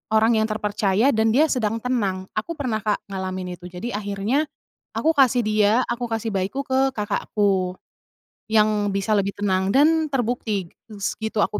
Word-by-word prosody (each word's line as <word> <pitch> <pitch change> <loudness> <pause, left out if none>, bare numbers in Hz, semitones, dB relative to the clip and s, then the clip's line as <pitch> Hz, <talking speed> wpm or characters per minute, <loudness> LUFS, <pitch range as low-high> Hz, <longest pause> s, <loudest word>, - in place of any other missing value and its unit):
orang 220 +1 +4
yang 220 - +1
terpercaya 210 +1 +1
dan 220 -1 +2
dia 305 +5 +4
sedang 225 -3 -1
tenang. 200 -7 -1
Aku 220 +10 -2
pernah 255 -8 -2
Kak 210 -1 -1
ngalamin 185 -2 -4
itu 175 - -14
jadi 185 +5 -5
akhirnya, 205 +8 -1 0.5
aku 320 -1 +1
kasih 255 -2 +5
dia, 215 -1 +3 0.2
aku 240 0 -2
kasih 225 -1 -2
bayiku 195 +6 -2
ke 265 -1 +1
kakakku, 200 -4 0 0.7
yang 215 -1 +3
bisa 200 +2 -1
lebih 200 -1 +1
tenang 190 -2 0
dan 310 +6 +4
terbukti 230 -8 -2 0.2
s 200 -3 -3
gitu 220 0 -3
aku 210 - -1
215 Hz, 160 wpm, -23 LUFS, 200-245 Hz, 0.7 s, kasih